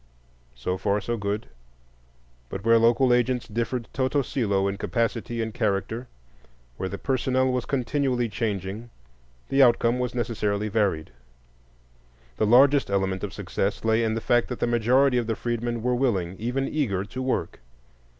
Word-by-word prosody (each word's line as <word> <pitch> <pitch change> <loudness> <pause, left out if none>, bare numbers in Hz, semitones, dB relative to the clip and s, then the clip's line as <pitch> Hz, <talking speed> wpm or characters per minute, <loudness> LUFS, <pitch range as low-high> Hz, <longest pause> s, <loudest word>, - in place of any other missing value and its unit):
So 90 +10 -3
far, 100 +2 +1
so 120 +4 -2
good; 105 0 -3 1.0
but 100 - -6
where 115 0 +6
local 120 +2 +4
agents 125 0 +1
differed 115 +2 -2
toto 135 +2 +1
cælo 100 -7 0
in 100 0 -2
capacity 115 0 -1
and 110 -1 -5
character, 110 +4 -1 0.7
where 95 - -3
the 100 - -5
personnel 130 0 +1
was 125 -1 -1
continually 130 -2 0
changing, 105 0 -3 0.6
the 135 - +3
outcome 120 -1 +4
was 125 -1 -2
necessarily 105 -3 -1
varied. 100 -7 0 1.3
The 110 - +2
largest 135 +4 +5
element 95 -1 0
of 105 - -3
success 100 +2 -3
lay 110 +1 +3
in 110 -1 0
the 115 - -2
fact 120 +1 +2
that 125 - -5
the - - +1
majority 125 +3 +3
of 120 - -3
the 115 - 0
freedmen 120 0 -3
were 125 0 +1
willing, 100 -9 0
even 125 +4 -1
eager, 110 -11 -1
to 130 +5 -6
work. 130 0 -2
115 Hz, 155 wpm, -25 LUFS, 105-125 Hz, 1.3 s, where